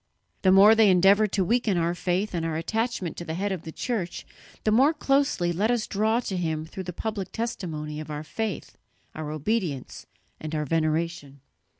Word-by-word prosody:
The 190 Hz, -, +4 dB
more 200 Hz, +3 st, +8 dB
they 220 Hz, -2 st, +5 dB
endeavour 195 Hz, +4 st, +5 dB
to 190 Hz, -2 st, 0 dB
weaken 225 Hz, -2 st, +1 dB
our 170 Hz, 0 st, +1 dB
faith 185 Hz, +3 st, -1 dB
and 170 Hz, -2 st, -1 dB
our 165 Hz, -1 st, -2 dB
attachment 205 Hz, +1 st, -2 dB
to -, -, -5 dB
the 160 Hz, -1 st, -4 dB
head 200 Hz, +3 st, -1 dB
of 185 Hz, -4 st, -3 dB
the 165 Hz, -2 st, -8 dB
Church, 205 Hz, -3 st, -3 dB, 0.4 s
the 215 Hz, -, +2 dB
more 270 Hz, +8 st, +4 dB
closely 275 Hz, -12 st, +1 dB
let 205 Hz, +6 st, +1 dB
us 240 Hz, -3 st, +1 dB
draw 220 Hz, +3 st, +1 dB
to 195 Hz, -5 st, -4 dB
him 160 Hz, -3 st, -2 dB
through 185 Hz, +3 st, -7 dB
the 180 Hz, -, -4 dB
public 205 Hz, +1 st, -4 dB
testimony 160 Hz, -10 st, -4 dB
of 155 Hz, -1 st, -7 dB
our 150 Hz, 0 st, -4 dB
faith, 215 Hz, +2 st, -5 dB, 0.3 s
our 155 Hz, -1 st, -5 dB
obedience 155 Hz, -, -3 dB, 0.3 s
and 155 Hz, 0 st, -5 dB
our 150 Hz, 0 st, -1 dB
veneration." 155 Hz, -2 st, -1 dB
180 Hz, 190 wpm, -26 LUFS, 160-220 Hz, 0.4 s, more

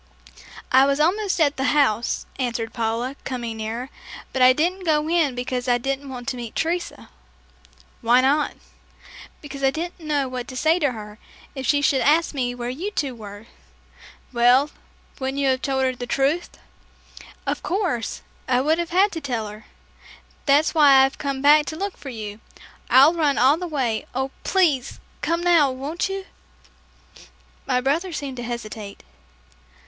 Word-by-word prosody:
"I 265 Hz, +1 st, +6 dB
was 280 Hz, +1 st, +1 dB
almost 375 Hz, +5 st, +1 dB
at 290 Hz, -3 st, +2 dB
the 265 Hz, -, -1 dB
house," 235 Hz, -5 st, +1 dB
answered 235 Hz, -3 st, -2 dB
Paula, 230 Hz, +3 st, -2 dB
coming 240 Hz, -4 st, -4 dB
nearer, 230 Hz, +5 st, -5 dB, 0.4 s
"but 265 Hz, -, -1 dB
I 255 Hz, 0 st, +8 dB
didn't 350 Hz, +8 st, 0 dB
go 305 Hz, -2 st, +1 dB
in 320 Hz, -6 st, +2 dB
because 250 Hz, 0 st, -3 dB
I 245 Hz, -1 st, +3 dB
didn't 275 Hz, +2 st, -3 dB
want 250 Hz, -1 st, -8 dB
to 255 Hz, -, -4 dB
meet 235 Hz, -2 st, -7 dB
Teresa." 340 Hz, +2 st, -3 dB, 0.9 s
"Why 240 Hz, +2 st, +5 dB
not?" 285 Hz, +3 st, +1 dB, 0.9 s
"Because 275 Hz, -2 st, -8 dB
I 270 Hz, -, +5 dB
didn't 340 Hz, +6 st, -5 dB
know 295 Hz, -4 st, -1 dB
what 250 Hz, -1 st, -5 dB
to 255 Hz, -, -7 dB
say 320 Hz, +5 st, +3 dB
to 285 Hz, -6 st, +1 dB
her, 210 Hz, -1 st, -9 dB, 0.3 s
if 265 Hz, -3 st, -5 dB
she 285 Hz, -1 st, +2 dB
should 270 Hz, -2 st, +3 dB
ask 320 Hz, +3 st, +3 dB
me 245 Hz, -3 st, -2 dB
where 240 Hz, -1 st, -5 dB
you 340 Hz, +11 st, -4 dB
two 285 Hz, -10 st, -2 dB
were." 205 Hz, -2 st, -10 dB, 0.9 s
"Well, 250 Hz, +5 st, +4 dB, 0.5 s
wouldn't 265 Hz, +1 st, -3 dB
you 280 Hz, -1 st, +2 dB
have 260 Hz, 0 st, +1 dB
told 265 Hz, -1 st, 0 dB
her 260 Hz, -1 st, 0 dB
the 245 Hz, 0 st, -6 dB
truth?" 280 Hz, +7 st, 0 dB, 1.0 s
"Of -, -, -2 dB
course, 345 Hz, -, -2 dB, 0.2 s
I 250 Hz, -1 st, +3 dB
would 310 Hz, +5 st, +2 dB
have 340 Hz, -1 st, -2 dB
had 385 Hz, +4 st, +3 dB
to 325 Hz, -, -5 dB
tell 240 Hz, -6 st, -3 dB
her. 215 Hz, +1 st, -12 dB, 0.8 s
That's 290 Hz, +3 st, +4 dB
why 280 Hz, -4 st, +7 dB
I've 270 Hz, -, -5 dB
come 275 Hz, -1 st, -3 dB
back 295 Hz, +1 st, +6 dB
to 315 Hz, -, -4 dB
look 395 Hz, +3 st, -4 dB
for 275 Hz, -, -9 dB
you. 215 Hz, -3 st, -7 dB, 0.5 s
I've 280 Hz, +6 st, +7 dB
run 300 Hz, -4 st, +1 dB
all 270 Hz, +5 st, +5 dB
the 360 Hz, +1 st, -4 dB
way. 255 Hz, -8 st, -2 dB
Oh, 265 Hz, +1 st, -1 dB
please, 310 Hz, -9 st, +1 dB, 0.2 s
come 335 Hz, +1 st, 0 dB
now; 340 Hz, -5 st, +4 dB
won't 280 Hz, +8 st, -3 dB
you?" 390 Hz, 0 st, -4 dB, 1.4 s
My 250 Hz, -2 st, +2 dB
brother 315 Hz, +8 st, 0 dB
seemed 280 Hz, -5 st, -5 dB
to 240 Hz, -, -5 dB
hesitate. 220 Hz, -4 st, -7 dB
270 Hz, 170 wpm, -23 LUFS, 245-310 Hz, 1.4 s, I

